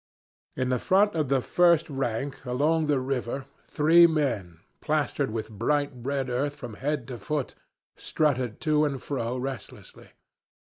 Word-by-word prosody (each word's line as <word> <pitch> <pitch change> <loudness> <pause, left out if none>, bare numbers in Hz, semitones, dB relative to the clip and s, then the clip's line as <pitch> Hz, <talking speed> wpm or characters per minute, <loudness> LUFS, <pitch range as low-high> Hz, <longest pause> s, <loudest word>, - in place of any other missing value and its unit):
In 130 0 0
front 200 - +3
of 155 -4 0
the 135 0 +2
first 170 +2 +3
rank, 135 -2 -3
along 150 +5 +1
the 145 -3 +2
river, 130 0 -3 0.2
three 165 +3 +5
men, 120 - -2 0.2
plastered - - 0
with 110 0 -4
bright 145 +7 0
red 135 +2 -3
earth 140 +4 -1
from 120 -3 -8
head 140 +2 -3
to 120 -3 -6
foot, 140 +6 -3 0.4
strutted 130 -7 -1
to 155 -1 +2
and 140 -3 -1
fro 125 -3 -3
restlessly. 130 0 -7
135 Hz, 140 wpm, -27 LUFS, 125-150 Hz, 0.4 s, three